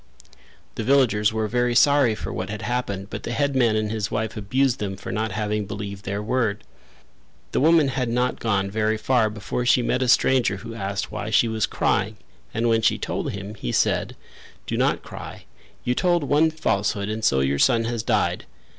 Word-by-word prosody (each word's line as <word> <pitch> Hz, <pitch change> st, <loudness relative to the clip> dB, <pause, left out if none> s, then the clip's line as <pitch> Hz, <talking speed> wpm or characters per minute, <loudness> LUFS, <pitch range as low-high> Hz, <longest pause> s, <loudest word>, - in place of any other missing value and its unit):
The -, -, -4 dB
villagers 110 Hz, -5 st, +3 dB
were 110 Hz, 0 st, -1 dB
very 120 Hz, +1 st, 0 dB
sorry 140 Hz, -4 st, +4 dB
for -, -, -6 dB
what 95 Hz, +2 st, -4 dB
had 105 Hz, 0 st, -5 dB
happened 105 Hz, -5 st, -3 dB
but -, -, -5 dB
the 120 Hz, -, -4 dB
headman 130 Hz, -3 st, +2 dB
and 110 Hz, -1 st, -1 dB
his 110 Hz, -2 st, -2 dB
wife 110 Hz, 0 st, -2 dB
abused 125 Hz, +5 st, 0 dB
them 95 Hz, -2 st, -4 dB
for -, -, -7 dB
not 110 Hz, -1 st, -2 dB
having 105 Hz, 0 st, -2 dB
believed 100 Hz, 0 st, -6 dB
their 100 Hz, +1 st, -3 dB
word. 110 Hz, -3 st, -1 dB, 0.9 s
The -, -, +1 dB
woman 155 Hz, -1 st, +4 dB
had 130 Hz, -2 st, -1 dB
not 125 Hz, +2 st, 0 dB
gone 100 Hz, -3 st, 0 dB
very 110 Hz, +1 st, 0 dB
far 110 Hz, -1 st, +2 dB
before 105 Hz, +3 st, -4 dB
she 125 Hz, 0 st, +3 dB
met 125 Hz, +2 st, 0 dB
a 130 Hz, -, +1 dB
stranger 125 Hz, -4 st, +3 dB
who 115 Hz, +3 st, -8 dB
asked 100 Hz, -3 st, -4 dB
why 105 Hz, 0 st, -4 dB
she 110 Hz, +1 st, +3 dB
was 110 Hz, -1 st, 0 dB
crying 105 Hz, +3 st, 0 dB, 0.3 s
and 115 Hz, +2 st, 0 dB
when 115 Hz, -1 st, +3 dB
she -, -, +2 dB
told -, -, -3 dB
him, 100 Hz, +1 st, -6 dB
he 65 Hz, -, -5 dB
said: -, -, +1 dB, 0.5 s
"Do -, -, -3 dB
not -, -, +1 dB
cry: -, -, -9 dB, 0.4 s
you 125 Hz, -, +1 dB
told 175 Hz, +3 st, +1 dB
one 150 Hz, +3 st, +3 dB
falsehood 100 Hz, -9 st, -1 dB
and 110 Hz, +1 st, -4 dB
so 65 Hz, -10 st, +3 dB
your 70 Hz, +1 st, 0 dB
son 115 Hz, -1 st, +4 dB
has 115 Hz, 0 st, -2 dB
died. 105 Hz, -6 st, 0 dB
110 Hz, 195 wpm, -23 LUFS, 105-125 Hz, 0.9 s, sorry